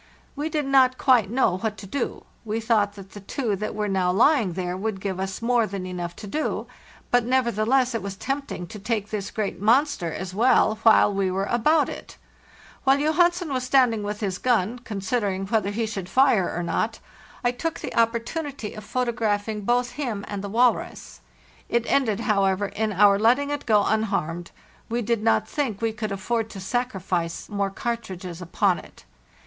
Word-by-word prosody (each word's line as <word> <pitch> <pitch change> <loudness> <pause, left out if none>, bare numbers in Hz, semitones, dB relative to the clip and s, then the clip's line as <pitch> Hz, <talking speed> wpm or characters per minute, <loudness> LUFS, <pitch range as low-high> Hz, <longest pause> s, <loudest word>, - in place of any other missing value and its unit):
We 295 +2 -2
did 300 -2 -1
not 260 -2 +4
quite 245 -7 +4
know 225 -6 +1
what 215 +1 -2
to - - -9
do; 245 +6 -4 0.2
we 220 0 -2
thought 215 -3 +1
that 195 -2 -12
the 205 - -9
two 210 +2 -2
that 215 - -4
were 210 0 -1
now 190 -2 +1
lying 225 - +3
there 180 0 -3
would 200 +1 -3
give 190 -1 -3
us 190 +3 -4
more 235 -2 +3
than 195 -2 -5
enough 175 -1 -5
to - - -9
do, 305 +10 -2 0.5
but 245 -1 +4
neverthe 235 -4 +1
less 260 0 +3
it 230 - -2
was 195 0 -5
tempting 270 -5 -4
to 210 +5 -9
take 215 0 -2
this 205 -2 -3
great 210 -3 -3
monster 230 - +2
as 185 +3 -5
well, 220 0 +3
while 220 -2 +5
we 195 -1 0
were 190 +1 -1
about 295 +9 +3
it. - - -9 0.7
While 270 0 +4
Johansen 335 +2 +2
was 255 -1 -1
standing 250 -4 +3
with 205 +1 -4
Jhis 195 -3 -2
gun, 240 -1 +1
considering 200 -3 -2
whether 205 0 0
he 225 +3 -1
should 195 -4 -5
fire 250 -5 +4
or 175 - -3
not, 220 +6 -1 0.5
I 245 - +3
took 325 +6 -4
the - - -6
opportunity 235 +2 -1
of 215 - -9
photographing 220 -3 -1
both 240 +3 +1
him 235 -9 -4
and 205 -1 -5
the 200 - -4
walrus. 240 +3 0 0.5
It 235 -1 +1
ended, 230 -6 +1
however, 195 -3 +2
in 220 0 -2
our 200 0 +5
letting 255 +6 +3
it 290 -2 -4
go 210 -2 +4
unharmed; 175 -6 -1 0.4
we 235 +1 -1
did 230 0 0
not 225 +1 +2
think 260 -9 -2
we 225 -1 -1
could 220 -1 -4
atford 220 +3 -2
to 195 - -8
sacrifice 190 -6 -2
more 200 -1 -1
cartridges 190 -5 -5
upon 180 +1 +1
it. - - -16
220 Hz, 185 wpm, -24 LUFS, 195-245 Hz, 0.7 s, while